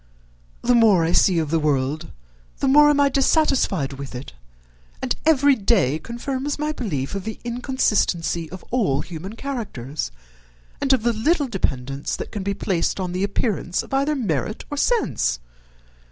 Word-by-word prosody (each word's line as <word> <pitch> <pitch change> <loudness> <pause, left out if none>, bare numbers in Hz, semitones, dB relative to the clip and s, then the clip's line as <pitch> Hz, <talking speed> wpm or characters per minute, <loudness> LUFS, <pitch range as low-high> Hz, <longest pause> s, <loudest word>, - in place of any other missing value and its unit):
The 245 - +3
more 215 -8 +5
I 165 - 0
see 180 0 +4
of 155 -2 -1
the 165 - +2
world 145 0 0 0.5
the - - 0
more 295 +2 +7
am 290 -1 +3
I 285 - +5
dissatisfied 270 - +2
with 135 -1 -8
it; 125 +3 -8 0.7
and - - -1
every 285 -2 +5
day 195 - +2
confirms 260 - -4
my 300 +1 -1
belief 165 - -3
of 195 -1 -3
the 220 +2 -6
inconsistency 220 - 0
of 185 +1 -10
all 195 - +1
human 180 +6 -8
characters, 210 - -4 0.7
and 275 - +2
of 260 -4 +3
the 235 0 +2
little 290 +7 +1
dependence 135 - -2
that - - -6
can 210 - -4
be 200 +1 -2
placed 185 -2 -1
on 180 -2 -2
the 185 +2 -1
appearance 200 -3 -1
of - - -11
either 280 +3 +2
merit 215 - -2
or - - -2
sense. 290 - +1
205 Hz, 165 wpm, -22 LUFS, 160-265 Hz, 0.7 s, more